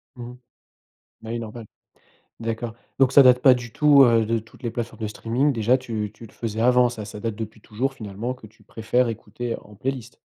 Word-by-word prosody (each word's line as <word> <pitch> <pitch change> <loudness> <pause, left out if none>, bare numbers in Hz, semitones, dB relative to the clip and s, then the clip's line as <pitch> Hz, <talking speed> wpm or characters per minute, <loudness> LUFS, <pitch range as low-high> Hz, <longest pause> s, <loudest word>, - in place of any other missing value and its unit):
Mmh 120 - -8
mh. 125 - -13 0.9
Ben 110 - -8
oui 120 - -2
normal. 115 0 -8 0.7
D'accord, 115 0 -4 0.3
donc 130 -2 +5
ça 140 - +8
date 125 -1 +6
pas 130 -1 +7
du 120 -2 -5
tout, 145 -2 +6
heu, 115 -2 +3
de 115 +1 0
toutes 115 +4 -18
les 115 - -2
plateformes 115 0 -5
de 110 - -1
streaming 120 +7 0
déjà. 115 +1 +2
Tu 110 -5 -4
tu 115 - -12
le 110 - -16
faisais 110 -1 -4
avant, 125 +1 +5
ça 110 -3 -7
ça 105 0 -8
date 110 -1 -3
depuis 110 0 -7
toujours 125 +6 -3
finalement, 110 +1 -5
que 125 -4 -14
tu 110 - -25
préfères 115 +2 0
écouter 115 +2 -5
en 105 - -16
playlist? 125 +1 -5
115 Hz, 215 wpm, -23 LUFS, 110-125 Hz, 0.9 s, ça